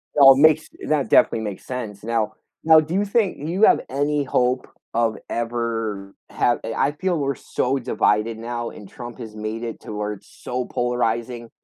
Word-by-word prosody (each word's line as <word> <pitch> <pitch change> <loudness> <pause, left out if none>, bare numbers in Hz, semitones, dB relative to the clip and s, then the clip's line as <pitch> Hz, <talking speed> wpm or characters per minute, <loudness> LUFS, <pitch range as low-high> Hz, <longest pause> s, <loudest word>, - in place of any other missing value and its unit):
well, 135 -2 +9
it - - -2
makes 155 0 +5 0.2
that 150 -2 +1
definitely 115 - +4
makes 105 -3 -6
sense. 110 -6 -6
Now 110 -2 -1 0.3
now 160 0 +7
do 155 +2 -3
you 200 +2 +1
think 205 -2 +1
you 185 +6 0
have - - +6
any 145 +2 0
hope 125 -1 0 0.3
of 115 -1 +1
ever 115 -4 -3 0.2
have 120 - +1
I 115 +5 0
feel 175 +2 -1
we're 140 -2 -1
so 130 +3 -1
divided 115 -2 +1
now, 120 +1 -4
and 100 -3 -12
Trump 120 -3 -9
has 110 -3 -8
made 110 +2 -4
it 115 -1 -5
to - - -8
where 105 0 -2
it's 100 - -14 0.2
so 125 0 -2
polarizing, 120 -1 -2
120 Hz, 180 wpm, -22 LUFS, 110-140 Hz, 0.3 s, well